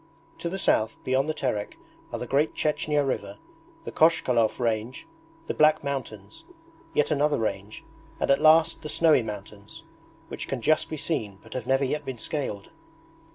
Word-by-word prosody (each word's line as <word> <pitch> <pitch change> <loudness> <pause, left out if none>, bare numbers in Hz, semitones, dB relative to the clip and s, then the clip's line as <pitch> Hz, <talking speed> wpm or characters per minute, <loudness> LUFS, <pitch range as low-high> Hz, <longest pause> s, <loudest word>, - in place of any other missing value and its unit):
To 170 - -3
the 190 - -4
south, 110 - +1
beyond 135 +3 +1
the - - +1
Terek, 105 -8 -3 0.3
are - - -3
the - - -5
Great 145 +3 +1
Chechnya 150 -1 0
river, 100 -6 -3 0.5
the - - -6
Kochkalov 125 -9 +3
range, 115 - -2 0.4
the - - -2
Black 155 0 +4
Mountains, 110 -8 -6 0.5
yet 150 - +2
another 150 0 +2
range, 105 -1 -4 0.4
and - - +1
at 140 - +3
last 160 +1 +5
the 155 - -6
snowy 155 -3 +4
mountains, 105 -2 -9 0.4
which - - -6
can 135 - -3
just 155 +6 +2
be 155 - -4
seen 110 -11 -3
but - - -12
have 125 -2 -5
never 135 +1 +2
yet 150 +3 -2
been 130 -3 -6
scaled. 110 -6 -4
135 Hz, 165 wpm, -26 LUFS, 110-150 Hz, 0.5 s, last